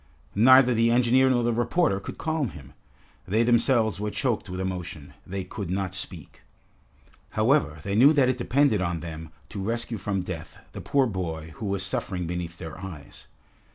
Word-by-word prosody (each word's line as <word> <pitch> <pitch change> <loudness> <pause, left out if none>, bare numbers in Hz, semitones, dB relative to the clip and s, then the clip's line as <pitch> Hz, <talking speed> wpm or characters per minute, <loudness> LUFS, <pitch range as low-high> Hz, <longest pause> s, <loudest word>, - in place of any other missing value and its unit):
Neither 125 +3 +6
the 115 0 +3
engineer 125 +2 +4
nor 120 -2 +2
the 120 0 +1
reporter 120 - +1
could 100 - -8
calm 155 -5 -1
him. 70 -5 -12 0.5
They 110 +5 +2
themselves 115 -4 +2
were 105 0 -2
choked 115 -3 -2
with 90 0 -5
emotion. 90 -6 -5
They 95 +1 -4
could 95 -1 -6
not 95 0 -2
speak. 90 -4 -8 1.0
However, 110 - +2
they 100 - -3
knew 130 +8 +7
that 140 -4 +4
it 130 0 0
depended 120 -4 +2
on 85 -3 -2
them 80 -1 -7 0.2
to 100 - -5
rescue 115 +2 -3
from 95 -1 -2
death 90 -3 -7
the - - -7
poor 140 -2 +2
boy 80 -7 -4
who 105 - -4
was 100 -1 -1
suffering 90 -2 -2
beneath 85 0 -4
their 80 -1 -8
eyes. 90 -6 -10
100 Hz, 175 wpm, -26 LUFS, 90-120 Hz, 1.0 s, knew